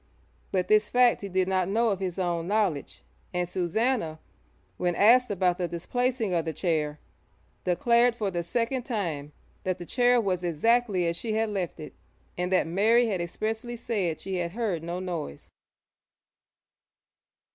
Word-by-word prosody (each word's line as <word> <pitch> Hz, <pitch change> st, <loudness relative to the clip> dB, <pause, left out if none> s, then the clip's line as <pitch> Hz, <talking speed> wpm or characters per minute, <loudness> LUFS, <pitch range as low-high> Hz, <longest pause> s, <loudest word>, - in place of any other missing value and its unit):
But 185 Hz, -2 st, 0 dB
this 215 Hz, 0 st, +4 dB
fact 245 Hz, -1 st, +4 dB
he 200 Hz, -, -5 dB
did 185 Hz, 0 st, +1 dB
not 185 Hz, -1 st, +1 dB
know 225 Hz, +3 st, +2 dB
of 195 Hz, -3 st, -1 dB
his 185 Hz, -2 st, -3 dB
own 175 Hz, -2 st, -1 dB
knowledge, 195 Hz, -8 st, -1 dB, 0.3 s
and 180 Hz, 0 st, 0 dB
Susannah, 180 Hz, 0 st, 0 dB, 0.6 s
when 175 Hz, -1 st, 0 dB
asked 245 Hz, +5 st, +5 dB
about 185 Hz, -3 st, +1 dB
the 175 Hz, -, 0 dB
displacing 230 Hz, +5 st, -1 dB
of 170 Hz, -2 st, +1 dB
the 160 Hz, -, -3 dB
chair, 155 Hz, -4 st, -1 dB, 0.7 s
declared 235 Hz, +6 st, +3 dB
for 210 Hz, -4 st, -2 dB
the 175 Hz, -1 st, -1 dB
second 235 Hz, +8 st, -1 dB
time 170 Hz, -, -3 dB, 0.3 s
that 185 Hz, -1 st, -1 dB
the 175 Hz, -, -8 dB
chair 245 Hz, +4 st, +3 dB
was 185 Hz, -5 st, -1 dB
exactly 195 Hz, +3 st, +2 dB
as 170 Hz, 0 st, 0 dB
she 220 Hz, +5 st, -3 dB
had 220 Hz, 0 st, +1 dB
left 190 Hz, -4 st, -3 dB
it, 155 Hz, -, -8 dB, 0.4 s
and 180 Hz, +1 st, -2 dB
that 185 Hz, -, +3 dB
Mary 215 Hz, +8 st, +3 dB
had 190 Hz, -4 st, -1 dB
expressly 220 Hz, +7 st, -3 dB
said 200 Hz, -9 st, -2 dB
she 190 Hz, -1 st, -4 dB
had 170 Hz, -1 st, -2 dB
heard 210 Hz, -8 st, -1 dB
no 170 Hz, +2 st, -4 dB
noise. 170 Hz, -, -6 dB
185 Hz, 160 wpm, -27 LUFS, 175-225 Hz, 0.7 s, asked